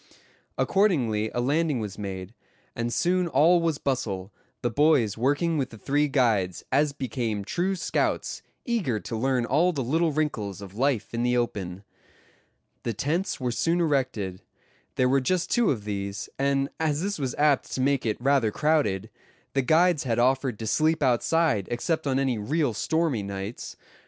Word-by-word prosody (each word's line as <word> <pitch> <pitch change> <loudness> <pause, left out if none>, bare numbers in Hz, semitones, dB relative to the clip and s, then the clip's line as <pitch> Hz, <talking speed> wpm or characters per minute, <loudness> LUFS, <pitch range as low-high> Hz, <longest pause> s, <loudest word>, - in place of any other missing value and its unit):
Accordingly 125 - +2
a 120 - -1
landing 145 +1 +1
was 105 -3 -5
made, 95 0 -6 0.4
and 115 0 -2
soon 180 +7 +1
all 165 +4 +4
was 165 -3 0
bustle, 110 -9 -2 0.3
the 120 - 0
boys 140 -6 +3
working 145 +7 +1
with 135 - -1
the 110 - -12
three 145 +7 +1
guides, 110 - +1
as 145 +2 +3
became 120 -6 -3
true 185 - -1
scouts, 170 - -1 0.2
eager 190 - 0
to 115 - -5
learn 125 +1 +1
all 160 +9 +3
the 140 -6 -2
little 160 +6 +1
wrinkles 110 - -2
of 100 -2 -10
life 120 -1 0
in 115 - -1
the 125 0 +2
open. 100 -6 -3 1.0
The 115 - -3
tents 165 - -1
were 125 -2 -1
soon 165 +8 +1
erected. 130 - -1 0.5
There 130 - +3
were 135 +1 +3
just 180 +6 0
two 240 -3 +3
of 110 -7 -1
these; 100 -1 -4
and 140 0 +1
as 155 0 0
this 200 -3 -2
was 130 -3 -2
apt 145 -2 +2
to 130 - -1
make 140 0 +2
it 110 -2 -1
rather 135 -3 +2
crowded, 110 -7 0 0.4
the 135 - +2
guides 160 +4 +3
had 120 -4 -1
offered 130 -1 +2
to 110 - -6
sleep 155 +7 +2
outside 130 - +2
except 150 +6 -1
on 135 -1 +1
any 130 -4 0
real 140 +4 0
stormy 160 +1 0
nights. 100 +3 -6
130 Hz, 165 wpm, -26 LUFS, 110-155 Hz, 1.0 s, all